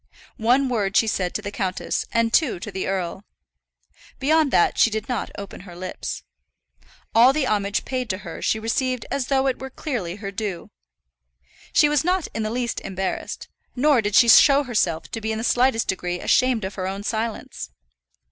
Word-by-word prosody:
One 250 +5 +3
word 210 -5 0
she - - +5
said 190 -4 -1
to - - -3
the 200 - -4
countess 190 -2 -2
and 230 0 +1
two 265 - +2
to 210 - -6
the 190 -1 -3
earl. 190 0 -3 0.9
Beyond 310 +2 +3
that 175 - +2
she - - +6
did 220 0 -4
not 245 -3 -2
open 200 -1 -8
her 180 -2 -12
lips. 185 +1 -6 0.9
All 240 +3 +7
the 295 -2 0
homage 205 -4 0
paid 255 -3 -3
to 185 - -1
her 180 -4 -8
she - - +1
received 250 +2 -1
as 270 -2 -1
though 270 -1 +2
it 265 -2 0
were 265 - -6
clearly 240 - -4
her 200 -1 -6
due. 200 -3 -5 1.0
She 295 - +5
was 295 -2 +2
not 365 0 0
in 225 - -3
the 215 - -1
least 240 0 -2
embarrassed, 190 0 -4 0.3
nor 270 -1 +4
did 205 -1 -1
she 235 - +7
show 280 +4 +7
herself 180 - 0
to 225 - -4
be 220 +1 -2
in 220 - -2
the 225 - -4
slightest 245 -1 +2
degree 180 -1 -2
ashamed 255 0 +2
of 190 - -5
her 185 -1 -4
own 195 +1 -4
silence. 220 +1 -4
225 Hz, 190 wpm, -23 LUFS, 195-255 Hz, 1.0 s, All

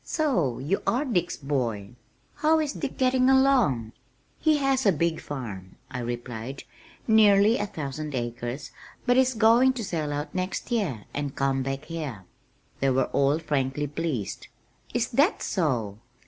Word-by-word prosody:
"So 210 - 0
you 155 +10 -1
are 255 +5 +2
Dick's 180 - 0
boy? 120 -8 -2 0.5
How 310 +2 +3
is 300 -2 -1
Dick 285 - -5
getting 255 0 +3
along?" 250 - +3 0.5
"He 310 -1 +3
has 270 -4 +1
a - - +7
big 165 0 0
farm," 105 -10 -7 0.2
I 130 - -4
replied, 120 +1 -5 0.4
"nearly 215 0 +5
a 205 - -2
thousand 150 -4 -5
acres, 120 +2 -4 0.3
but 245 - +4
he's 260 -1 +3
going 230 +4 +5
to 245 -3 -4
sell 160 -6 -2
out 145 +1 -4
next 185 +6 -3
year 170 - -1
and 145 -2 -3
come 135 -1 +1
back 135 +2 -4
here." 150 - -5 0.6
They 135 - +2
were 130 0 +1
all 140 +2 +3
frankly 145 -2 -1
pleased. 145 - -3 0.4
"Is - - 0
that - - +2
so! 110 -5 -1
150 Hz, 150 wpm, -26 LUFS, -, 0.6 s, a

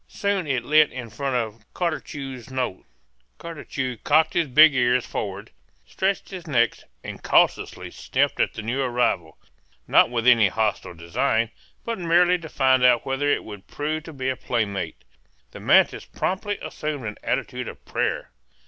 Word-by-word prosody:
Soon 200 -4 -1
it 130 -4 -1
lit 155 +2 +5
in 125 -3 -7
front 135 +5 -2
of 115 -2 -3
Cartucho's 140 -7 -4
nose. 130 -7 -3 0.5
Cartucho 140 -6 -5
cocked 155 +2 +3
his 170 -3 +1
big 155 +4 +7
ears 125 -1 +2
forward, 100 -1 -5 0.3
stretched 190 - -2
his 185 -3 -8
neck, 120 -6 +2 0.3
and - - -8
cautiously - - +1
sniffed - - -1
at - - +1
the 110 - -6
new 125 +5 -1
arrival, 120 - 0 0.5
not - - +5
with 120 -1 -2
any 115 -4 +6
hostile 105 -3 -2
design, 110 +7 0 0.3
but 230 -3 -3
merely 175 +1 +3
to 160 -2 -9
find 130 -2 +3
out 125 -1 +4
whether 135 +2 0
it - - +1
would 105 -3 -10
prove 155 +2 -3
to 165 - -8
be 130 -3 -4
a 130 - -1
playmate. 100 -10 -3 0.5
The - - -10
mantis - - +4
promptly 200 +2 -2
assumed 150 -5 -4
an 105 -1 -5
attitude - - -2
of - - -10
prayer. - - -2
130 Hz, 160 wpm, -24 LUFS, 115-155 Hz, 0.5 s, big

